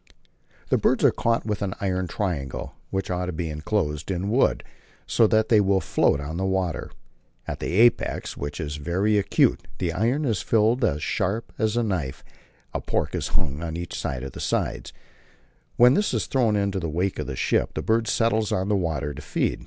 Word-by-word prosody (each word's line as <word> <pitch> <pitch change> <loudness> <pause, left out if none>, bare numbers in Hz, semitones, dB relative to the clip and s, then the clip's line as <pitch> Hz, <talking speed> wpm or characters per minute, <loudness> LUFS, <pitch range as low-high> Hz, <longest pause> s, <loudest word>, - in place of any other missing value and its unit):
The - - +3
birds - - +2
are - - +7
caught 115 0 0
with 105 -2 -2
an 95 -2 -2
iron 95 -2 -1
triangle, 85 -10 -3 0.2
which 95 -1 -2
ought 90 0 -1
to - - -2
be 80 -1 -3
enclosed 75 -1 -2
in 95 +2 -1
wood, 130 +4 +2 0.4
so 115 - +4
that 110 +1 +2
it 110 - +7
will 100 -1 +3
float 70 - +2
on 75 +3 -5
the 95 - -1
water. 95 -3 -1 0.6
At - - -4
the - - -3
apex, 120 +4 +3
which 75 +3 -5
is 75 -2 -4
very 95 +8 +1
acute, 100 - +2
the 85 -2 -1
iron 120 - +1
is 110 -8 0
filed 115 +3 +2
as 75 -9 +1
sharp 110 +9 -1
as 110 0 +1
a 120 - +2
knife, 70 - -2 0.5
and - - -3
pork - - 0
is - - -2
hung 70 +3 -2
on 85 -1 -4
each 85 0 -5
of 65 0 -3
the - - -9
sides. - - -2 0.8
When 125 +1 +7
this 205 +8 +1
is - - 0
thrown 120 -6 +2
in 100 -1 +1
the 95 -4 -2
wake 90 +5 -1
of - - -3
the 65 - -4
ship, - - 0
the - - -2
bird 115 0 +1
settles 110 -2 +1
on 95 +2 0
the 105 - +3
water 80 -6 -1
to 75 - -8
feed. 75 - -1
95 Hz, 200 wpm, -25 LUFS, 80-110 Hz, 0.8 s, are